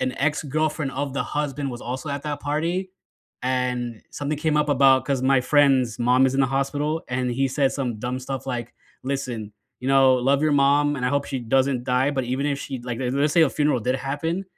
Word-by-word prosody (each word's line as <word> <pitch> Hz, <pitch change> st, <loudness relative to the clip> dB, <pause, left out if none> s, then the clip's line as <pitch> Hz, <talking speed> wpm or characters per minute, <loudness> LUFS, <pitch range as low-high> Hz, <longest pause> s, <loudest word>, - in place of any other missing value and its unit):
an 130 Hz, 0 st, 0 dB
ex-girlfriend 150 Hz, 0 st, -1 dB
of 140 Hz, -1 st, -3 dB
the 140 Hz, -, 0 dB
husband 145 Hz, -1 st, -3 dB
was 120 Hz, -1 st, -7 dB
also 130 Hz, +5 st, -5 dB
at 140 Hz, -1 st, -3 dB
that 150 Hz, -1 st, -4 dB
party, 170 Hz, +6 st, -2 dB, 0.5 s
and 125 Hz, -3 st, -2 dB
something 145 Hz, +1 st, -3 dB
came 150 Hz, 0 st, 0 dB
up 150 Hz, 0 st, +2 dB
about 135 Hz, -2 st, +4 dB
'cause 135 Hz, -3 st, -1 dB
my 135 Hz, 0 st, +4 dB
friend's 130 Hz, -4 st, +3 dB
mom 125 Hz, +2 st, +4 dB
is 130 Hz, -, -1 dB
in 135 Hz, -, +2 dB
the 135 Hz, -, +4 dB
hospital, 145 Hz, +4 st, -1 dB
and 125 Hz, 0 st, -1 dB
he 135 Hz, +2 st, 0 dB
said 135 Hz, 0 st, +1 dB
some 125 Hz, -5 st, -3 dB
dumb 125 Hz, +3 st, -3 dB
stuff 135 Hz, +1 st, -6 dB
like, 120 Hz, -2 st, -4 dB, 0.3 s
"Listen. 125 Hz, -6 st, -4 dB, 0.3 s
You 130 Hz, -, -3 dB
know, 135 Hz, -1 st, +5 dB
love 135 Hz, +3 st, +2 dB
your 155 Hz, -, +2 dB
mom, 145 Hz, +1 st, +3 dB
and 125 Hz, -2 st, -1 dB
I -, -, +2 dB
hope 140 Hz, +1 st, 0 dB
she 135 Hz, -, -4 dB
doesn't 130 Hz, +1 st, +1 dB
die, 130 Hz, +3 st, +2 dB
but 130 Hz, -3 st, -2 dB
even 130 Hz, +3 st, -2 dB
if 145 Hz, -1 st, 0 dB
she, 130 Hz, -3 st, -6 dB
like 120 Hz, -1 st, -5 dB
le 130 Hz, -, -3 dB
let's 145 Hz, +2 st, +1 dB
say 170 Hz, -, +4 dB
a 155 Hz, -, +4 dB
funeral 145 Hz, -4 st, +1 dB
did 125 Hz, +4 st, 0 dB
happen, 145 Hz, +8 st, -3 dB
135 Hz, 220 wpm, -23 LUFS, 125-145 Hz, 0.5 s, know